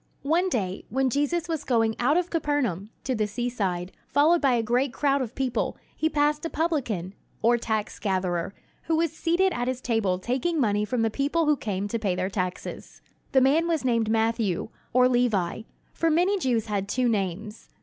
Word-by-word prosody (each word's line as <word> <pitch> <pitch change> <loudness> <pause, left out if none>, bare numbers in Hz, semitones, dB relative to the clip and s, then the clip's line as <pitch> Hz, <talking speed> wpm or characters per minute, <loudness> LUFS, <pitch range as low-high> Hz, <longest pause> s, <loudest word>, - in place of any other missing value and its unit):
One 340 +6 +2
day, 195 - -2
when 265 0 +1
Jesus 290 +6 0
was 320 -3 -2
going 225 -3 +1
out 285 +7 +3
of 355 0 -1
Capernaum, 275 - -1
to 260 - -1
the 215 -3 0
seaside, 200 -5 -2 0.2
followed 320 +4 +4
by 270 -3 +3
a 235 -1 +1
great 245 +4 +1
crowd 280 +1 +1
of 245 -2 -5
people, 260 -3 -1 0.2
he 315 - +1
passed 295 0 +1
a 330 - -2
publican, 250 - -1 0.3
or 235 +2 +5
tax 220 -2 -2
gatherer, 185 -3 -1 0.3
who 325 - +1
was 325 0 +1
seated 350 +4 +1
at 245 +1 -2
his 255 -1 -1
table 225 -7 0
taking 260 - -1
money 210 -4 +2
from 235 +1 0
the 225 - +1
people 290 +7 0
who 300 0 +4
came 205 -6 -3
to 230 +3 -2
pay 200 -5 0
their 185 +2 -2
taxes. 185 -2 -5 0.3
This 265 -2 +5
man 310 +6 +3
was 325 -5 0
named 230 -3 +2
Matthew, 225 -4 0 0.2
or 250 +1 +5
Levi; 230 -7 +1 0.3
for 330 - +1
many 360 +5 +2
Jews 240 - +1
had 200 -2 -2
two 250 +3 +1
names. 210 0 -3
245 Hz, 190 wpm, -26 LUFS, 210-295 Hz, 0.3 s, or